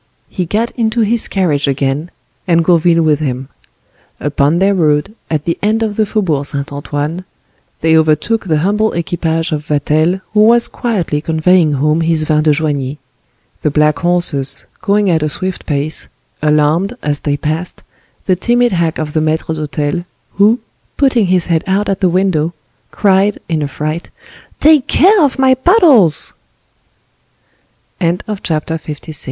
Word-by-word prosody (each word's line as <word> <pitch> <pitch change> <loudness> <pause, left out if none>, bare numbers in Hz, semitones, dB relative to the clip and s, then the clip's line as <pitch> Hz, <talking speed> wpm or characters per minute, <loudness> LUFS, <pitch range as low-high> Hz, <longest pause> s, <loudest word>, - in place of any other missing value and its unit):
He 180 -2 -3
got 225 +6 -1
into 230 -1 -1
his 225 +1 +1
carriage 155 -7 0
again, 140 +4 -1 0.4
and 170 -2 +2
Gourville 170 -1 +3
with 155 -2 +2
him. 130 -3 -4 0.7
Upon 145 +2 +1
their 195 +2 +2
road, 150 0 +1 0.2
at 155 -2 -2
the 170 - -2
end 220 +2 +1
of 215 -2 -2
the 215 -1 +1
Faubourg 175 -10 0
Saint 140 0 -2
Antoine, 145 +4 -4 0.6
they 160 0 +3
overtook 160 +8 +1
the 160 -4 +1
humble 210 +2 +1
equipage 165 -1 -2
of 150 0 -3
Vatel, 155 +5 +1
who 210 - +2
was 235 +1 +4
quietly 185 -11 -2
conveying 160 0 +2
home 150 +4 +1
his 165 -1 +2
vin 155 0 +1
de 155 - +1
Joigny. 145 -2 -2 0.6
The - - +1
black 150 +1 +2
horses, 155 -6 0 0.2
going 205 0 +1
at 160 -2 +1
a 155 - 0
swift 185 +5 -3
pace, 150 +1 -2 0.3
alarmed, 155 +7 +1
as 145 -1 -1
they 145 -1 -2
passed, 155 +4 -4 0.4
the 185 - +2
timid 240 +6 +1
hack 170 -3 0
of 150 -1 -4
the 155 - +1
maitre 160 +1 -1
d'hotel, 150 +2 -3 0.3
who, 215 +4 +3 0.4
putting 255 -7 +2
his 180 -1 +2
head 165 -2 0
out 195 +2 0
at 195 - -1
the 185 - +2
window, 170 -3 0 0.3
cried, 200 0 +2
in 160 -2 -1
a 145 - -1
fright, 155 +4 -4 0.5
"Take 305 -3 +4
care 385 +2 +4
of 280 -2 +1
my 265 -1 +4
bottles!"* 260 - +3 0.8
* - - -43
In 170 +1 0
the - - -5
f 160 -4 -4
165 Hz, 160 wpm, -14 LUFS, 150-200 Hz, 0.8 s, was